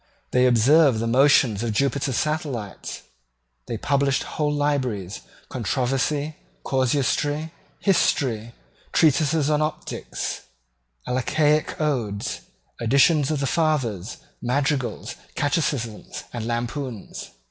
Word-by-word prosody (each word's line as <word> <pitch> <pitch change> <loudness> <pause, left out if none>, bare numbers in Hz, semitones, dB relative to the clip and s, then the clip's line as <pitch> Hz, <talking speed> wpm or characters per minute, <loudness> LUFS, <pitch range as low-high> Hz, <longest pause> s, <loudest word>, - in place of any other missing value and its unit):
They 125 0 +4
observed 130 +3 +5
the 115 - -1
motions 125 -3 +4
of 115 -2 -1
Jupiter's 135 +1 0
satellites. 145 - -3 0.6
They 115 - -3
published 140 +3 +1
whole 150 -1 -1
libraries, 130 -10 -1 0.3
controversy, 135 +5 -1 0.3
casuistry, 145 +4 0 0.3
history, 120 - +1 0.4
treatises 155 -1 +3
on 150 0 +2
optics, 155 0 -4 0.7
Alcaic 150 +4 +1
odes, 120 -10 -1 0.4
editions 140 +5 +4
of 155 -3 -1
the - - +1
fathers, 130 - 0 0.2
madrigals, 135 +1 -1 0.2
catechisms, 140 -7 -2
and 115 -2 -4
lampoons. 120 0 -4
135 Hz, 95 wpm, -24 LUFS, 120-150 Hz, 0.7 s, observed